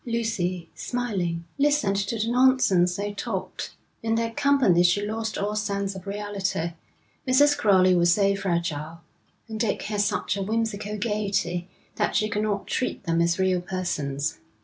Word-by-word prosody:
Lucy, 220 -7 -2
smiling, 185 -9 -2
listened 285 -8 +2
to 200 +3 -1
the 220 +1 -1
nonsense 240 -8 +4
they 205 +1 -3
talked. 205 - -5 0.3
In 225 0 0
their 230 0 0
company 265 -9 +3
she 180 +4 +3
lost 220 +1 -3
all 205 +1 -1
sense 200 -2 -1
of 190 0 -10
reality; 195 -4 -2 0.6
Mrs. 290 +3 +5
Crowley 190 -9 +4
was 175 -1 +4
so 200 +1 +3
fragile, 170 -4 -2 0.5
and 220 -1 -6
Dick 225 -2 0
had 210 -1 -1
such 200 -1 0
a 200 - -3
whimsical 210 0 -2
gaiety, 200 -5 -1 0.3
that - - 0
she 215 - +2
could 210 0 -1
not 205 -2 -1
treat 255 - -2
them 165 0 +1
as 170 0 +2
real 185 -1 +2
persons. 155 -6 -3
200 Hz, 155 wpm, -25 LUFS, 180-225 Hz, 0.6 s, Mrs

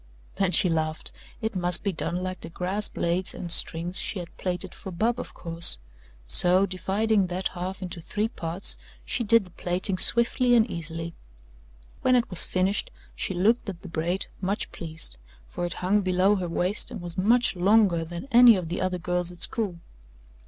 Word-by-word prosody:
Then 195 -2 +1
she 180 - +5
laughed 160 -2 -2 0.3
it 220 -1 -3
must 175 -1 +4
be 200 -2 -1
done 175 +2 -3
like 185 -1 -5
the 165 - -7
grass 185 +5 -1
blades 175 +2 -2
and 175 - -6
strings 170 +2 +2
she - - -3
had 175 -2 -8
plaited 180 0 -3
for - - -9
Bub, 230 +7 0
of - - -8
course, 165 - +1 0.5
so, 180 - +5
dividing 200 +2 0
that 180 +1 -2
half 185 +2 -6
into 175 -2 -6
three 210 +6 -2
parts, 175 -4 -2 0.3
she 240 - -1
did 230 -1 +4
the 180 - -16
plaiting 180 +2 -1
swiftly 240 +1 +4
and 230 -1 +4
easily. 165 -1 -5 0.9
When 255 - +3
it 240 -1 +2
was 180 - +8
finished 190 +2 -1 0.3
she 190 - -2
looked 215 +5 +1
at 175 -3 -8
the 185 - -9
braid, 170 +4 -2 0.2
much 195 +2 -2
pleased 160 - -7 0.3
for 175 - -4
it 175 - -5
hung 205 +3 +3
below 185 +1 +2
her 180 -2 -4
waist 180 +5 +1
and - - -7
was 175 -1 -7
much 230 +6 +2
longer 190 -2 +3
than 170 +8 -8
any 240 -1 +8
of 180 -4 -4
the 175 - -3
other 185 -1 -1
girls' 180 0 -2
at 175 - -6
school. 220 -9 -3
185 Hz, 185 wpm, -26 LUFS, 175-205 Hz, 0.9 s, was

